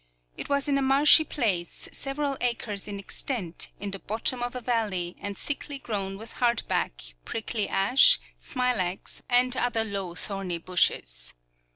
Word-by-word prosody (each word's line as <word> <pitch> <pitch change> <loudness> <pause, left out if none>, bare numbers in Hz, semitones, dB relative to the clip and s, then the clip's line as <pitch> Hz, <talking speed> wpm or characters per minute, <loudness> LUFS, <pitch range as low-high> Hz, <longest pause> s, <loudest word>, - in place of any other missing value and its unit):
It - - -5
was 280 0 +1
in 280 -1 +2
a - - 0
marshy 280 +4 +7
place, 200 - 0
several 275 0 -2
acres 230 -5 -2
in 205 -1 -5
extent, 195 -2 -3
in 205 0 -4
the 195 - -6
bottom 225 +5 -1
of 245 +1 -3
a - - -2
valley, 210 -8 -1
and 200 -1 -5
thickly 285 0 -4
grown 195 -6 -4
with 225 +2 -10
hardback, 140 - 0
prickly 220 -1 -2
ash, 260 - +6 0.2
smilax, 240 -9 -1
and 250 +1 +5
other 240 -3 +1
low 195 -5 -3
thorny 195 -3 -3
bushes. - - 0
225 Hz, 150 wpm, -27 LUFS, 195-255 Hz, 0.2 s, marshy